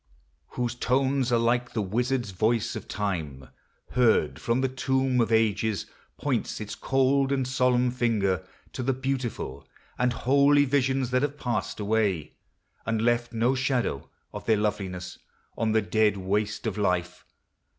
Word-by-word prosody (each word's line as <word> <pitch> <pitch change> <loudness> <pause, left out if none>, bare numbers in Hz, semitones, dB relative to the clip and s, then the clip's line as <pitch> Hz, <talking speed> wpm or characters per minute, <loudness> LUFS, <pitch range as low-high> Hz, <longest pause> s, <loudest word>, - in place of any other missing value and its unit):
Whose 120 -1 0
tones 130 +1 +1
are 120 - +4
like 120 +1 +1
the 110 - 0
wizard's 120 +2 -1
voice 110 +4 0
of - - -7
Time 80 -11 -4 0.4
Heard 110 - +2
from 120 +2 +1
the 130 - +2
tomb 130 -1 +1
of 115 - 0
ages, 110 -1 +1 0.3
points 130 -4 -2
its 105 -1 -5
cold 135 +1 +1
And 135 -2 0
solemn 125 -1 +2
finger 105 -7 0 0.3
to - - -4
the 135 +2 +1
beautiful 130 - -4 0.3
And 125 0 +2
holy 140 +4 +4
visions 135 -2 +1
that 130 0 +2
have 145 0 -1
passed 110 -9 -2
away, 105 -6 0 0.5
And 115 -1 -1
left 120 +1 +1
no 120 +2 +2
shadow 130 - -1 0.2
of - - -8
their 110 - +4
loveliness 95 -4 -3 0.4
On 110 -1 0
the 110 -1 +2
dead 105 -1 +2
waste 105 +4 -1
of 105 -2 -2
life. 90 -2 -1
120 Hz, 150 wpm, -27 LUFS, 105-130 Hz, 0.5 s, are